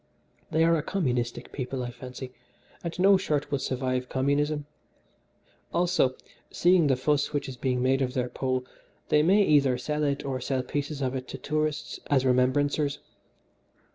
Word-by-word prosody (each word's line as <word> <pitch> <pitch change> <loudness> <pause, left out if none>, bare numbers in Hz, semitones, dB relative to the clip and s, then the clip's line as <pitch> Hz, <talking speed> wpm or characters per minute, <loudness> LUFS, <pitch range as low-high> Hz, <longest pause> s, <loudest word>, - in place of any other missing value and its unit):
They 160 +1 +2
are 165 0 +4
a 155 - 0
communistic 125 -10 -2
people, 130 -1 -4
I 120 - -4
fancy, 125 +1 -9 0.5
and 170 -1 -4
no 195 +2 +6
shirt 150 -7 -1
will 140 - +1
survive 130 -1 -2
communism. 145 +2 0 1.1
Also, 170 -7 +2 0.3
seeing 175 -3 +4
the 135 - +3
fuss 145 +4 0
which 145 - -1
is 130 - -6
being 125 0 -1
made 135 +1 +2
of 130 0 -1
their 125 -1 0
Pole, 130 -1 -2 0.4
they 150 - +5
may 195 +6 +5
either 140 -7 +4
hide 150 +4 -2
it 140 -1 0
or 130 -2 -2
sell 130 0 -1
pieces 145 0 -3
of 130 0 -1
it 130 -1 -4
to - - -6
tourists 155 0 -2
as 135 -2 +2
remembrancers. 140 +3 +2
140 Hz, 165 wpm, -27 LUFS, 130-150 Hz, 1.1 s, no